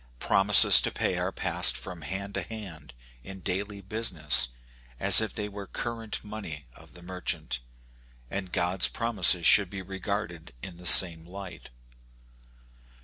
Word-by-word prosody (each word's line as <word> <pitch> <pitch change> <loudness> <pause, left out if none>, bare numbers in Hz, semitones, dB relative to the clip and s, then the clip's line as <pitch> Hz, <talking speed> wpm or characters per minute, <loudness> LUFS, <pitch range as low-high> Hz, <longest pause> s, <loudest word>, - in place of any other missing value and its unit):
Promises 95 +8 +6
to - - -2
pay - - -4
are - - -4
passed 60 - +2
from 85 +7 -11
hand 100 +6 -8
to 95 - -4
hand 85 - -12 0.3
in 95 +6 -11
daily 100 +2 -6
business, 95 - -1 0.5
as 100 +2 +6
if 110 - -5
they 105 -1 -7
were 100 -1 -11
current 115 -2 -5
money 100 -9 -10
of - - -20
the 90 - -16
merchant; 90 -8 -6 0.7
and 95 +5 -8
God's 90 +1 +1
promises 110 -7 +2
should 100 +1 +4
be 95 0 -9
regarded 95 - -8
in 90 -2 -10
the 90 0 -9
same 85 -3 +6
light. 95 -4 -12
95 Hz, 145 wpm, -25 LUFS, 85-100 Hz, 0.7 s, Promises